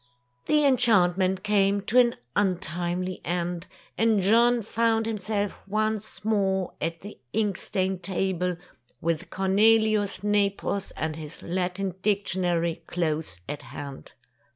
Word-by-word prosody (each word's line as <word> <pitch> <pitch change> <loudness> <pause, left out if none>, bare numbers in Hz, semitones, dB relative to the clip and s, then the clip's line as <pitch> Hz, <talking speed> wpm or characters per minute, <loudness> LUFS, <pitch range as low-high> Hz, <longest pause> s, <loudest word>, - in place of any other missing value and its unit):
The 300 -1 +3
enchantment 190 -8 +4
came 200 -1 +3
to 225 +5 +3
an 240 -1 +4 0.2
untimely 180 -1 -1
end, 175 0 -2 0.3
and 225 -1 +4
John 230 +4 +4
found 225 +1 +1
himself 210 -2 -2
once 215 0 -2
more 195 -4 +1
at 165 +1 -3
the 205 +2 -10
ink 210 -3 +1
stained 190 -1 -2
table, 180 -1 -1 0.4
with 165 -1 -2
Cornelius 205 0 +2
Nepos 200 -1 0
and 155 0 -2
his 155 -1 -9
Latin 185 +2 -2
dictionary 180 -5 0
close 155 - -2
at 145 0 -5
hand. 140 -1 -9
195 Hz, 115 wpm, -26 LUFS, 175-215 Hz, 0.4 s, enchantment